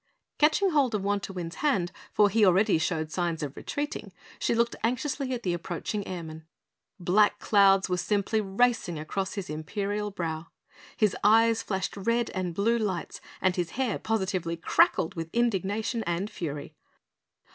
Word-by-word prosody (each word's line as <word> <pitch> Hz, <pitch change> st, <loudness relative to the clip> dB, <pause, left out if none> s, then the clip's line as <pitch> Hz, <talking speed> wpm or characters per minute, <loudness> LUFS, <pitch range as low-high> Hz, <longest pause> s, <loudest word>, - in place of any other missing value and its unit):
Catching 320 Hz, +6 st, +4 dB
hold 275 Hz, -7 st, +2 dB
of 200 Hz, -, -2 dB
Wantowin's 195 Hz, -4 st, -3 dB
hand, 225 Hz, -, +1 dB, 0.2 s
for 210 Hz, -, +5 dB
he 220 Hz, +2 st, +3 dB
already 190 Hz, -1 st, +4 dB
showed 160 Hz, -1 st, -1 dB
signs 170 Hz, -3 st, -1 dB
of 145 Hz, -1 st, -5 dB
retreating, 290 Hz, +1 st, -4 dB, 0.3 s
she -, -, +1 dB
looked 235 Hz, +1 st, +1 dB
anxiously 260 Hz, +3 st, -1 dB
at 245 Hz, -2 st, -3 dB
the 180 Hz, -, 0 dB
approaching 175 Hz, +4 st, -4 dB
Airman. 160 Hz, -3 st, -7 dB, 0.5 s
Black 195 Hz, +4 st, +3 dB
clouds 195 Hz, -2 st, +4 dB
were 180 Hz, -1 st, 0 dB
simply 205 Hz, +3 st, 0 dB
racing 205 Hz, -3 st, +1 dB
across 190 Hz, +5 st, -3 dB
his 200 Hz, -3 st, -4 dB
imperial 200 Hz, +7 st, -3 dB
brow; 165 Hz, -4 st, -4 dB, 0.5 s
his 215 Hz, -3 st, +2 dB
eyes 225 Hz, +2 st, +5 dB
flashed 190 Hz, -2 st, -3 dB
red 230 Hz, +4 st, 0 dB
and 180 Hz, -3 st, -3 dB
blue 230 Hz, +5 st, +2 dB
lights 190 Hz, -6 st, -3 dB, 0.2 s
and 185 Hz, -1 st, +3 dB
his 175 Hz, -2 st, -1 dB
hair 260 Hz, -5 st, 0 dB
positively 190 Hz, -6 st, -1 dB
crackled 165 Hz, +1 st, +3 dB
with 165 Hz, -3 st, -5 dB
indignation 220 Hz, 0 st, 0 dB
and 175 Hz, +5 st, -2 dB
fury. 150 Hz, -4 st, -5 dB
195 Hz, 150 wpm, -28 LUFS, 175-225 Hz, 0.5 s, for